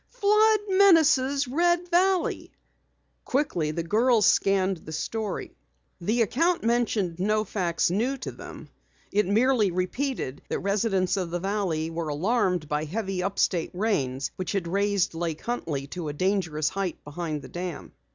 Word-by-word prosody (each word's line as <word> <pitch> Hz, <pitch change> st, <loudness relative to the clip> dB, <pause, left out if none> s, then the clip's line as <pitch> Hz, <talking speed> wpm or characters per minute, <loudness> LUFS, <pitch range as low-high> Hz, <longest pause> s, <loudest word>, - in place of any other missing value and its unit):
"FLOOD 430 Hz, -1 st, +3 dB
MENACES 315 Hz, -8 st, +4 dB
RED 345 Hz, +6 st, +1 dB
VALLEY!" 370 Hz, +1 st, +1 dB, 0.7 s
Quickly 250 Hz, -, 0 dB
the 165 Hz, +2 st, -3 dB
girls 220 Hz, +5 st, +3 dB
scanned 195 Hz, -1 st, +3 dB
the 155 Hz, -, -11 dB
story. 215 Hz, +7 st, -4 dB, 0.4 s
The 220 Hz, +7 st, +1 dB
account 330 Hz, -, +1 dB
mentioned 225 Hz, -7 st, 0 dB
no 215 Hz, +3 st, +1 dB
facts 175 Hz, -5 st, 0 dB
new 240 Hz, +8 st, 0 dB
to 260 Hz, -, -6 dB
them. -, -, -11 dB, 0.4 s
It 210 Hz, -1 st, +2 dB
merely 225 Hz, +1 st, +3 dB
repeated 185 Hz, -, -3 dB
that -, -, -1 dB
residents 200 Hz, -1 st, 0 dB
of 180 Hz, -3 st, -2 dB
the 175 Hz, +1 st, -2 dB
valley 180 Hz, -5 st, -1 dB
were 165 Hz, -1 st, -3 dB
alarmed 180 Hz, +1 st, 0 dB
by 150 Hz, 0 st, -1 dB
heavy 195 Hz, +2 st, -3 dB
up 195 Hz, +2 st, -3 dB
state 170 Hz, -4 st, +1 dB
rains 140 Hz, -, -1 dB
which 185 Hz, -2 st, -3 dB
had 190 Hz, -4 st, -1 dB
raised 200 Hz, +1 st, +1 dB
Lake 165 Hz, -1 st, -3 dB
Huntley 160 Hz, -, -3 dB
to 175 Hz, -3 st, -5 dB
a 145 Hz, -, -3 dB
dangerous 165 Hz, -3 st, 0 dB
height 195 Hz, -4 st, -3 dB
behind 150 Hz, 0 st, -5 dB
the -, -, -10 dB
dam. 175 Hz, -2 st, -6 dB
195 Hz, 150 wpm, -26 LUFS, 170-245 Hz, 0.7 s, MENACES